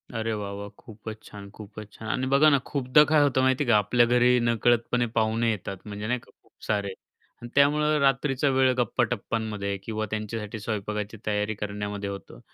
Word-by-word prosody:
अरे 115 0 -1
वाह, 105 -2 -4
वाह! 100 0 -7
खूपच 110 0 -10
छान, 100 -1 -11
खूपच 105 0 -11
छान. 110 - -9
आणि 130 +3 -1
बघा 155 +3 +6
ना 140 - +4
खूपदा 140 +1 +4
काय 150 +1 +3
होतं 140 -2 +2
माहिती 130 +2 +2
आहे 130 - -4
का, 110 - +6
आपल्या 120 +4 +3
घरी 125 +1 +4
नकळतपणे 120 +1 +1
पाहुणे 115 +1 +1
येतात. 100 -2 -5
म्हणजे 105 0 -6
नाही 125 +2 0
का - - -22
खूप - - -27
सारे 100 -2 -1 0.6
त्यामुळं 150 +2 +3
रात्रीचा 135 0 +2
वेळ 130 -1 +3
गप्पा-टप्पांमध्ये 110 -4 -1
किंवा 110 0 -3
त्यांच्यासाठी 110 0 -4
स्वयंपाकाची 105 0 -4
तयारी 105 0 -1
करण्यामध्ये 105 0 -4
होतं. 100 0 -9
110 Hz, 170 wpm, -26 LUFS, 105-125 Hz, 0.6 s, बघा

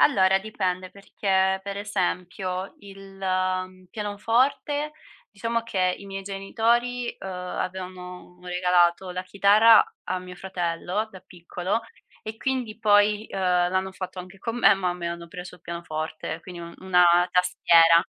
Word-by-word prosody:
Allora, 190 -7 +5
dipende 185 -3 -3
perché 190 -1 0
per 200 0 -5
esempio 185 -1 -3
il 195 -1 -13 0.7
pianoforte, 240 +8 0 0.4
diciamo 230 +2 -2
che 185 -5 0
i 200 - -11
miei 195 0 -6
genitori, 235 +5 0
uhm, 190 - -6
avevano 180 0 -6
regalato 180 0 +2
la 180 +1 -4
chitarra 205 +4 +6 0.2
a 185 0 -2
mio 180 0 -10
fratello 180 +2 -3
da 185 -3 -12
piccolo 180 +3 -4 0.4
e 220 0 -6
quindi 250 -4 -2
poi, 210 0 +3
uhm, - - -4
l'hanno 185 +1 +1
fatto 185 0 -7
anche 185 +2 -9
con 230 +4 -4
me, 235 - +6
ma 190 -2 -1
a - - -3
me 170 -1 -4
hanno 170 0 -6
preso 180 +1 -9
il - - -27
pianoforte, 160 -1 -5
quindi 180 -1 -9
un 170 0 -9
una 180 -1 +4 0.3
tastiera. 170 -2 +5
190 Hz, 140 wpm, -25 LUFS, 180-205 Hz, 0.7 s, chitarra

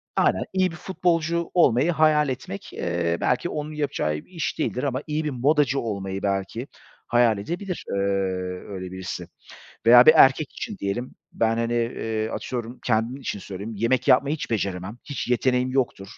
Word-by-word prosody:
aynen, - - +2
iyi 185 -1 +2
bir - - -9
futbolcu 170 -2 -1
olmayı 150 -2 +4
hayal 155 -2 +3
etmek, 125 -6 -6
eee, 85 -1 -1
belki 125 +7 +1
onun 150 0 -4
yapacağı 145 - -1
bir 75 - -6
iş 165 -4 -3
değildir 125 - -1
ama 135 -2 -1
iyi 155 +1 -1
bir 150 - -1
modacı 140 +1 +2
olmayı 100 -3 -4
belki 100 +6 -2 0.4
hayal 120 -3 +4
edebilir, 175 - -4
eee, - - -2 0.7
öyle 95 -2 -6
birisi. 95 -1 -6 0.6
Veya 120 +1 +9
bir 155 - +10
erkek 135 0 +5
için 215 - -6
diyelim; 120 - -3 0.2
ben, 115 0 +1
hani, 115 0 -1
eee, 115 -2 -1
atıyorum, 120 +1 -5
kendim 115 +2 +1
için 120 - -4
söyleyeyim, 100 +3 -7
yemek 120 +4 0
yapmayı 140 +3 +4
hiç 155 - -6
beceremem, 100 0 -2
hiç 140 -4 -5
yeteneğim 125 +1 +1
yoktur. 120 -7 -1
125 Hz, 165 wpm, -24 LUFS, 105-150 Hz, 0.7 s, bir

